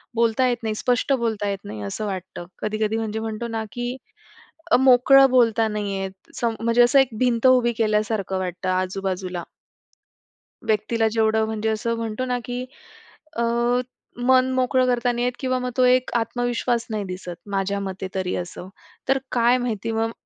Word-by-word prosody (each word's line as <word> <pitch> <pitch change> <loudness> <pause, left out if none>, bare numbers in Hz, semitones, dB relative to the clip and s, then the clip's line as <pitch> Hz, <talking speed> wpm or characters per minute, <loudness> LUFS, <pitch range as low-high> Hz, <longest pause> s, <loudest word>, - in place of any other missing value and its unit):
बोलता 230 +2 +2
येत 245 -1 +1
नाही, 220 -1 -1
स्पष्ट 250 +4 +1
बोलता 225 -5 -1
येत 200 -1 -3
नाही 105 0 -7
असं 100 - -4
वाटतं. 185 -3 -6
कधी-कधी 215 +1 -1
म्हणजे 220 -1 -3
म्हणतो 220 +1 -4
ना 225 -1 -3
की 245 +1 -4 0.8
अ, - - +7
मोकळं 265 +1 +6
बोलता 230 -3 +4
नाही 205 -2 -3
येत. 190 0 -3 0.2
सम 230 -2 -1
म्हणजे 230 +1 +3
असं 240 +3 +5
एक 270 -2 +3
भिंत 245 -1 +3
उभी 250 -2 +4
केल्यासारखं 215 -3 0
वाटतं 185 0 -3
आजूबाजूला. 185 -1 -2 1.2
व्यक्तीला 225 +1 +1
जेवढं 220 0 +2
म्हणजे 220 0 -2
असं 230 +2 -1
म्हणतो 230 +2 -3
ना 250 -1 -1
की 245 +1 -4 0.7
अ, 235 - +1 0.8
मन 260 0 +4
मोकळं 255 0 +2
करता 245 0 +1
नाही 240 0 -1
येत 250 - 0
किंवा 255 -1 0
मग 250 0 -3
तो 255 - +4
एक 250 0 +3
आत्मविश्वास 240 0 -1
नाही 215 -2 -2
दिसत, 180 -1 -6 0.2
माझ्या 195 0 -1
मते 190 -1 -5
तरी 185 -1 -1
असं. 180 +1 -6 0.4
तर 270 - +4
काय 240 +1 +3
माहिती 230 -3 -2
मग 225 0 0
225 Hz, 165 wpm, -23 LUFS, 205-245 Hz, 1.2 s, अ